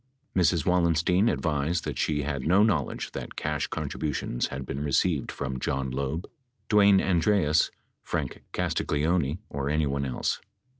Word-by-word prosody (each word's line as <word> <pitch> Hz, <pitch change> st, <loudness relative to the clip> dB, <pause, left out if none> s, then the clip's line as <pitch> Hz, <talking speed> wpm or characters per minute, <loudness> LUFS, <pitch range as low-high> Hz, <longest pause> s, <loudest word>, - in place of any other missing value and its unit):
Mrs. 85 Hz, -4 st, +3 dB
Wallenstein 90 Hz, +3 st, +3 dB
advised 80 Hz, 0 st, 0 dB
that -, -, -4 dB
she 75 Hz, -2 st, 0 dB
had 70 Hz, -1 st, -2 dB
no 95 Hz, +5 st, +5 dB
knowledge 90 Hz, -, 0 dB
that -, -, -7 dB
cash 75 Hz, -2 st, -1 dB
con -, -, -3 dB
tributions 75 Hz, -5 st, -2 dB
had 65 Hz, 0 st, -6 dB
been 70 Hz, +3 st, -4 dB
received 75 Hz, +1 st, +1 dB
from 65 Hz, -2 st, -4 dB
John 65 Hz, 0 st, -1 dB
Loeb, 70 Hz, +6 st, -3 dB, 0.4 s
Dwayne 100 Hz, -2 st, +6 dB
Andreas, 85 Hz, -3 st, +3 dB, 0.3 s
Frank -, -, -3 dB
Castagleoni, 75 Hz, 0 st, 0 dB
or 70 Hz, 0 st, -3 dB
anyone 70 Hz, -2 st, 0 dB
else. 65 Hz, -, -1 dB
75 Hz, 140 wpm, -27 LUFS, 70-90 Hz, 0.4 s, Dwayne